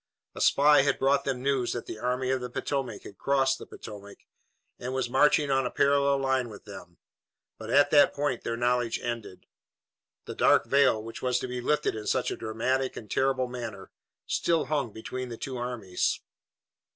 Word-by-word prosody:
A - - -7
spy 145 0 +5
had 140 +1 +1
brought 140 +1 +2
them 135 -2 -1
the 125 - -9
news 135 -3 0
that 120 - -5
the 110 - -7
Army 125 +2 -1
of 130 -1 0
the 125 - -5
Potomac 135 +1 -3
had 100 - -12
crossed 135 -1 +1
the - - -10
Potomac 100 -2 -10 0.6
and 130 +2 -4
was 125 -2 -1
marching 145 +1 +4
on 135 0 +2
a 125 - -1
parallel 140 +1 +3
line 130 -2 0
with 105 - -12
them, 95 -4 -11 0.6
but 110 0 -8
at 145 +4 +4
that 145 -1 +6
point 145 -4 -1
their 115 0 -2
knowledge 120 -1 0
ended. 115 -6 -6 0.8
The - - -6
dark - - +4
veil, 130 -6 +3
which 115 +1 -8
was 125 -1 +1
to 130 - -3
be 125 0 -4
lifted 150 +4 +1
in 105 -1 -6
such 130 - 0
a - - -2
dramatic 120 +4 -2
and 105 -3 -9
terrible 130 -1 +1
manner, 125 -1 -7 0.3
still 165 -2 +1
hung 145 -6 -1
between 125 +4 -6
the 115 - -7
two 130 +1 -5
armies. 120 -7 -2
125 Hz, 190 wpm, -28 LUFS, 115-135 Hz, 0.8 s, that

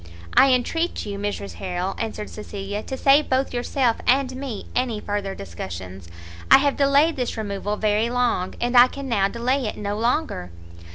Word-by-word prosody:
"I 270 - +6
entreat 325 +8 0
you, 200 -1 -5
Mrs 100 - -4
Harrel," 180 +1 -2
answered 215 -2 -4
Cecilia, 205 -1 -5
"to 265 - -6
save 280 +3 +4
both 260 0 +1
yourself 245 -1 0
and 260 0 +2
me 260 -6 -6
any 245 -4 0
further 205 -2 -3
discussions. 90 0 -8 0.4
I - - +10
have 280 0 +1
delayed 285 +3 +3
this 250 -3 -2
removal 205 -1 -3
very 215 +2 +1
long, 245 -7 0
and 240 +1 -1
I 245 +1 +9
can 275 +1 -7
now 205 -6 +2
delay 250 +4 -1
it - - -5
no 205 0 -3
longer." 235 - -1
230 Hz, 170 wpm, -23 LUFS, 200-260 Hz, 0.4 s, I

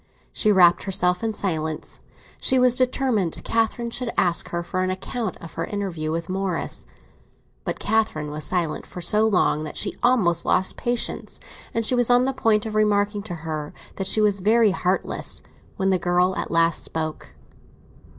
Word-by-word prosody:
She 215 - +2
wrapped 180 -3 +5
herself 180 -1 0
in 225 - 0
silence; 160 -6 -3 0.4
she 260 - +3
was 250 -1 +5
determined 250 - +1
Catherine 230 +1 0
should 240 0 -2
ask 175 -1 +2
her 170 0 -3
for 185 +2 -2
an 185 - 0
account 190 +2 -4
of 165 - -11
her - - -3
interview 180 -7 -3
with 165 +1 -3
Morris. 190 -1 -3 0.8
But - - -2
Catherine 205 -9 0
was 150 +1 -5
silent 170 -3 -2
for - - -9
so 210 +5 +3
long, 180 -6 +2
that 155 - -6
she 200 - +1
almost 200 -9 +3
lost 185 - +1
patience; 240 0 -2 0.3
and 230 -1 -1
she 255 - +2
was 245 -1 +2
on 245 +1 +5
the 270 - 0
point 220 -4 +2
of 220 - -4
remarking 205 -1 +1
to 200 -4 -6
her 155 -2 -4 0.2
that 195 - 0
she 215 - +4
was 205 -2 +2
very 215 +2 +4
heartless, 185 0 -1 0.3
when 195 0 +1
the 185 - +2
girl 180 +2 +2
at - - -3
last 165 0 +2
spoke. 155 - -5
195 Hz, 175 wpm, -23 LUFS, 170-220 Hz, 0.8 s, wrapped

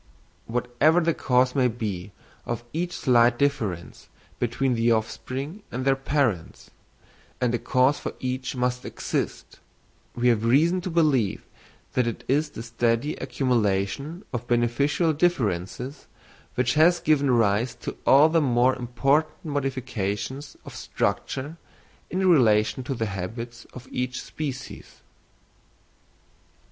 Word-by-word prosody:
Whatever 125 +7 +2
the 165 -1 +1
cause 125 -2 +2
may 130 -3 +3
be 105 -5 -4 0.3
of 120 -1 -4
each 175 +2 -2
slight 120 -1 +3
difference 110 -12 -2 0.3
between 125 +2 0
the 115 0 +2
offspring 130 - -3
and 130 +1 -3
their 135 0 +4
parents—and 125 - -3
a 120 - 0
cause 130 +5 +2
for - - -5
each 130 +1 -3
must 125 0 -1
exist—we 120 +1 -5
have 115 -3 +3
reason 160 +10 +3
to 185 - -4
believe 150 - +1 0.5
that 125 -2 +1
it 115 - -4
is 150 +3 +1
the 115 - -8
steady 115 +4 0
accumulation 125 - -1
of 120 0 -4
beneficial 125 +7 +2
differences 130 - -1 0.5
which 125 - +1
has 170 +3 +5
given 145 -3 +2
rise 115 0 +2
to - - -6
all 140 +3 +7
the 165 0 +2
more 125 -1 +3
important 135 +7 0
modifications 130 -1 -3
of - - -9
structure 145 +5 -2 0.5
in 185 +1 0
relation 115 -8 +4
to 135 +2 -3
the 115 - -1
habits 115 +5 -6
of 125 0 -11
each 125 0 -2
species. 135 -4 -7
125 Hz, 120 wpm, -25 LUFS, 115-145 Hz, 0.5 s, all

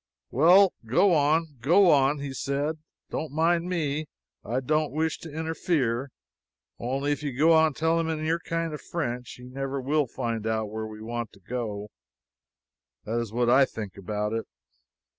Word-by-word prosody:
"Well, 180 +8 +6
go 135 - +3
on, 150 -1 +2
go 175 +7 +5
on," 140 +1 +4
he 140 -1 -4
said, 140 +4 -2 0.3
"don't 155 - -3
mind 170 +3 +1
me. 155 -3 -1 0.4
I 120 +4 -1
don't 155 +3 0
wish 160 +2 -1
to 160 - -9
interfere. 150 -5 -1 0.7
Only, 135 +4 -1
if 145 0 -1
you 140 -4 -4
go 160 +4 +5
on 160 -2 +4
telling 165 +1 +1
him 160 -1 -2
in 155 - -3
your 165 +2 +1
kind 165 -1 -3
of 150 - -6
French, 125 -7 -4
he 125 - -13
never 135 +2 -4
will 145 +2 +1
find 115 -2 -3
out 110 -1 -1
where 110 0 -4
we 110 0 -10
want 120 0 -4
to - - -17
go 105 -1 -5 1.1
to. 110 - -6
That 120 - +1
is 115 -3 -4
what 120 +1 +1
I 130 +3 +6
think 105 -6 -5
about 105 +2 -3
it." 115 0 -3
140 Hz, 180 wpm, -27 LUFS, 120-160 Hz, 1.1 s, Well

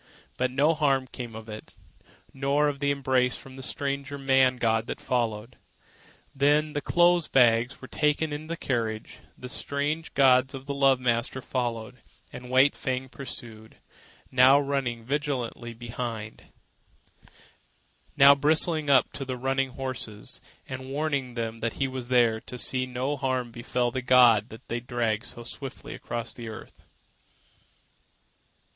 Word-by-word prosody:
But 130 0 0
no 145 +5 +3
harm 140 -4 +1
came 120 -3 -8
of 110 0 -9
it, 110 -1 -10 0.6
nor 140 +2 +1
of 145 -1 -2
the 140 0 +1
embrace 130 -2 +1
from 130 -1 -13
the 135 - -9
strange 140 +1 -3
man 135 -2 +3
god 115 -1 +1
that - - -5
followed. 115 -2 -2 0.8
Then 150 +2 +2
the 145 - -2
clothes 175 0 +3
bags 120 +1 +3
were - - -7
taken 150 +2 0
into 150 +1 -6
the 170 +1 -4
carriage, 115 -6 -3 0.2
the 125 - -8
strange 145 +5 -3
gods 130 -1 +4
and 135 0 -9
the 140 - -3
love 135 -2 +4
master 120 +1 0
followed, 120 -2 -3 0.4
and 125 0 -9
White 130 +3 +4
Fang 130 0 -3
pursued, 115 -4 -9 0.5
now 130 +2 +6
running 135 -5 -2
vigilantly 130 -4 -3
behind, 115 -2 -6 1.7
now 140 +1 +9
bristling 155 +1 +2
up 135 -3 +4
to 140 - -5
the 130 -1 -4
running 135 +1 0
horses 125 -5 -6 0.3
and 130 0 -7
warning 140 -3 -2
them 115 -1 -3
that 115 0 -2
he 135 - -1
was 130 -2 -6
there 120 -3 +3
to 125 - -8
see 130 +1 -1
that - - -12
no 130 +4 -2
harm 130 -3 -1
befell 120 +1 -1
the 130 - -3
god 120 -4 +5 0.2
they 120 - -2
dragged 115 -2 -1
so 120 - -8
swiftly 140 +4 -7
across 115 -2 -5
the 115 -1 -8
earth. 110 - -11
130 Hz, 150 wpm, -27 LUFS, 120-140 Hz, 1.7 s, now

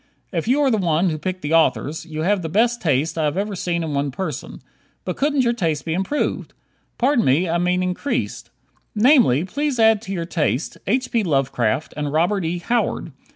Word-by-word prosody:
If 165 +1 -2
you 270 +5 +3
are 270 - +3
the 220 - +2
one 170 0 +1
who 155 - -4
picked 185 +2 -4
the 150 +2 -1
authors, 160 +1 +1
you 155 -1 -4
have 200 +2 +1
the 160 - -4
best 235 +7 +2
taste 155 +1 0
I 155 - +1
have 150 +4 -1
ever 200 +1 -2
seen 170 -2 -2
in 155 -2 -3
one 140 0 0
person. 150 -1 -5 0.5
But 180 - -3
couldn't 285 -1 +1
your 235 -1 +2
taste 165 - -1
be 160 - -1
improved? 195 - -2 0.4
Pardon 255 -1 +2
me, 145 +8 +2
I 170 +1 0
mean 180 +1 +1
increased. 185 +10 -3 0.5
Namely, 215 - +4
please 285 +5 -2
add 220 -2 +5
to 195 - -8
your 170 -3 -2
taste: 160 -4 -1
H. 255 +6 0
P. 230 - +2
Lovecraft 135 - 0
and 150 -1 -3
Robert 175 +5 +1
E. 170 +2 -1
Howard. 220 -3 -1
180 Hz, 200 wpm, -21 LUFS, 155-220 Hz, 0.5 s, add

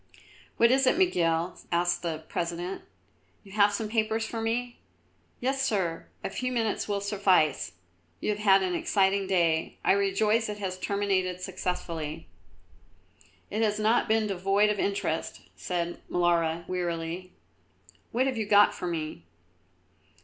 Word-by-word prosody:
"What 235 +1 +5
is 265 0 +3
it, 285 - +4
Miguel?" 170 - +1
asked 175 0 +1
the 160 -2 -4
President; 175 +2 -3 0.6
"you 195 - -15
have 205 0 +4
some 215 +2 -2
papers 220 0 0
for 225 0 -4
me?" 240 +2 -2 0.6
"Yes, 270 +2 0
Sir; 190 -10 -1 0.2
a - - -2
few 255 +5 -2
minutes 225 -3 -1
will 200 -1 -1
suffice. 190 - +2 0.5
You - - -2
have 210 - -3
had 195 -2 +5
an 185 -1 -1
exciting 195 +2 +1
day; 170 -4 +1
I - - +5
rejoice 210 +3 +2
it 210 - -4
has 185 -2 -4
terminated 190 -3 0
successfully." 170 - -4 1.3
"It 215 - -1
has 210 -2 +1
not 220 +3 +2
been 220 0 +2
devoid 200 +2 +2
of 205 - -3
interest," 200 0 -2
said 175 -1 -3
Molara, 170 -1 +1
wearily. 175 0 -3 0.8
"What 255 +3 +2
have 265 -3 -1
you 215 -2 -2
got 205 0 +6
for 180 - -5
me?" 155 - -4
195 Hz, 140 wpm, -28 LUFS, 175-215 Hz, 1.3 s, got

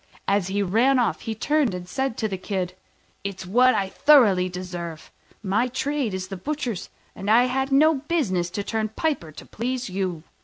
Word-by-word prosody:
As 195 -2 +2
he 200 +1 0
ran 235 +8 +3
off, 235 -6 +1
he 225 - -4
turned 285 -3 +1
and 180 0 -7
said 265 +3 -2
to 220 - 0
the 195 - -3
Kid, 185 -2 -3 0.5
"It's 195 -1 -5
what 250 +7 +4
I 195 - 0
thoroughly 205 -10 +5
deserve: 175 -3 -7 0.3
my 215 +5 +1
trade 260 -3 -2
is 185 0 -5
the 195 - -5
butcher's, 250 -3 -4 0.3
and 195 - -5
I 230 +3 +6
had 265 +2 -1
no 305 +4 +5
business 265 - -1
to 205 - -1
turn 220 +1 -2
piper 220 - -2
to - - -11
please 245 -1 -3
you." 180 -4 -2
215 Hz, 185 wpm, -24 LUFS, 185-260 Hz, 0.5 s, I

